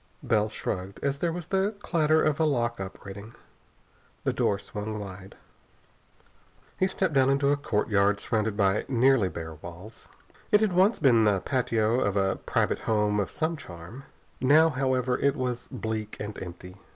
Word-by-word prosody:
Bell 110 Hz, -1 st, +2 dB
shrugged 95 Hz, -2 st, -5 dB
as 140 Hz, 0 st, 0 dB
there 170 Hz, +1 st, 0 dB
was 175 Hz, 0 st, -5 dB
the 195 Hz, +4 st, 0 dB
clatter 160 Hz, -5 st, +2 dB
of 155 Hz, 0 st, +1 dB
a -, -, +3 dB
lock 120 Hz, -6 st, 0 dB
operating. 100 Hz, +3 st, -8 dB, 0.9 s
The -, -, 0 dB
door 100 Hz, -, +1 dB
swung 105 Hz, +2 st, -6 dB
wide. 95 Hz, -2 st, -9 dB, 1.4 s
He 185 Hz, -, +3 dB
stepped 190 Hz, -3 st, -1 dB
down 135 Hz, -1 st, +4 dB
into 140 Hz, 0 st, +2 dB
a -, -, +4 dB
courtyard 105 Hz, -6 st, +1 dB
surrounded 110 Hz, -1 st, -1 dB
by 100 Hz, -1 st, +2 dB
nearly 125 Hz, -5 st, +3 dB
bare 80 Hz, -1 st, -7 dB
walls. 85 Hz, +7 st, -12 dB, 0.4 s
It 210 Hz, -, +6 dB
had 215 Hz, -4 st, +2 dB
once 190 Hz, +5 st, +4 dB
been 120 Hz, -7 st, +4 dB
the 100 Hz, -3 st, +2 dB
patio 115 Hz, -3 st, +1 dB
of 100 Hz, -5 st, 0 dB
a 95 Hz, -1 st, +1 dB
private -, -, 0 dB
home 105 Hz, -1 st, +1 dB
of 100 Hz, -, -1 dB
some 160 Hz, +1 st, -2 dB
charm. 95 Hz, -, -10 dB, 0.3 s
Now, 155 Hz, +5 st, +5 dB
however, 130 Hz, -2 st, 0 dB
it 140 Hz, -1 st, +2 dB
was 125 Hz, -2 st, -3 dB
bleak 110 Hz, -3 st, -4 dB
and 105 Hz, 0 st, -5 dB
empty. 90 Hz, +1 st, -9 dB
115 Hz, 165 wpm, -27 LUFS, 100-140 Hz, 1.4 s, It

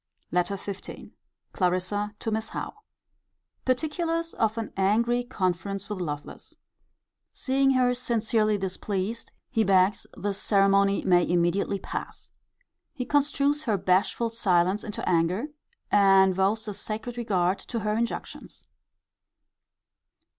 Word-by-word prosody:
LETTER 180 Hz, +3 st, 0 dB
XV. 200 Hz, 0 st, -8 dB, 0.4 s
Clarissa 185 Hz, +3 st, -1 dB
to 225 Hz, -, -3 dB
Miss 220 Hz, 0 st, -2 dB
Howe. -, -, -5 dB, 0.9 s
Particulars 330 Hz, +5 st, -1 dB
of 220 Hz, 0 st, 0 dB
an 225 Hz, -2 st, -4 dB
angry 235 Hz, +5 st, +2 dB
conference 195 Hz, -3 st, -2 dB
with 195 Hz, -3 st, -3 dB
Lovelace. 145 Hz, -3 st, -6 dB, 0.8 s
Seeing 270 Hz, 0 st, +2 dB
her 250 Hz, -1 st, +3 dB
sincerely 225 Hz, -3 st, +1 dB
displeased, 195 Hz, +3 st, -3 dB, 0.2 s
he 225 Hz, -, +2 dB
begs 190 Hz, 0 st, +3 dB
the 205 Hz, 0 st, -2 dB
ceremony 195 Hz, 0 st, +3 dB
may 175 Hz, -2 st, +4 dB
immediately 175 Hz, +3 st, +1 dB
pass. -, -, -7 dB, 0.6 s
He 250 Hz, -4 st, -3 dB
construes 290 Hz, +1 st, +2 dB
her 215 Hz, -5 st, +1 dB
bashful 195 Hz, +5 st, +1 dB
silence 185 Hz, -2 st, +2 dB
into 210 Hz, -, -5 dB
anger, 180 Hz, -, +1 dB, 0.4 s
and 195 Hz, -2 st, +5 dB
vows 200 Hz, +4 st, 0 dB
a 210 Hz, -, -3 dB
sacred 220 Hz, +4 st, -5 dB
regard 195 Hz, -6 st, 0 dB
to 230 Hz, -2 st, -5 dB
her 210 Hz, 0 st, 0 dB
injunctions. 230 Hz, +1 st, -4 dB
205 Hz, 115 wpm, -26 LUFS, 190-235 Hz, 0.9 s, and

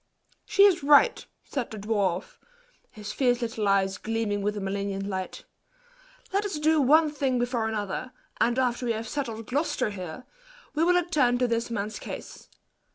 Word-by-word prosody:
"She 420 Hz, -1 st, +5 dB
is 380 Hz, -5 st, +5 dB
right," 290 Hz, -, +5 dB, 0.2 s
said 265 Hz, -5 st, -4 dB
the 220 Hz, -, -7 dB
dwarf, 200 Hz, -4 st, -1 dB, 0.5 s
his 210 Hz, -1 st, -8 dB
fierce 245 Hz, -3 st, +2 dB
little 225 Hz, -2 st, -2 dB
eyes 195 Hz, -1 st, +2 dB
gleaming 220 Hz, -2 st, -1 dB
with 210 Hz, +1 st, -1 dB
a -, -, -2 dB
malignant 195 Hz, 0 st, -3 dB
light; 190 Hz, -2 st, -5 dB, 0.9 s
"let 400 Hz, +1 st, +2 dB
us 395 Hz, -6 st, -3 dB
do 310 Hz, 0 st, +3 dB
one 305 Hz, +3 st, +5 dB
thing 270 Hz, -3 st, 0 dB
before 240 Hz, -2 st, 0 dB
another; 215 Hz, +3 st, -3 dB, 0.3 s
and 240 Hz, +1 st, +2 dB
after 250 Hz, -1 st, 0 dB
we 230 Hz, -, +2 dB
have 220 Hz, +1 st, -5 dB
settled 230 Hz, -5 st, -4 dB
Gloucester 270 Hz, -3 st, -1 dB
here, 185 Hz, +5 st, -7 dB, 0.5 s
we 305 Hz, +2 st, +1 dB
will 355 Hz, +1 st, +4 dB
attend 300 Hz, -9 st, +2 dB
to 250 Hz, 0 st, +2 dB
this 230 Hz, 0 st, -1 dB
man's 215 Hz, -1 st, -3 dB
case. -, -, -9 dB
235 Hz, 165 wpm, -27 LUFS, 205-285 Hz, 0.9 s, She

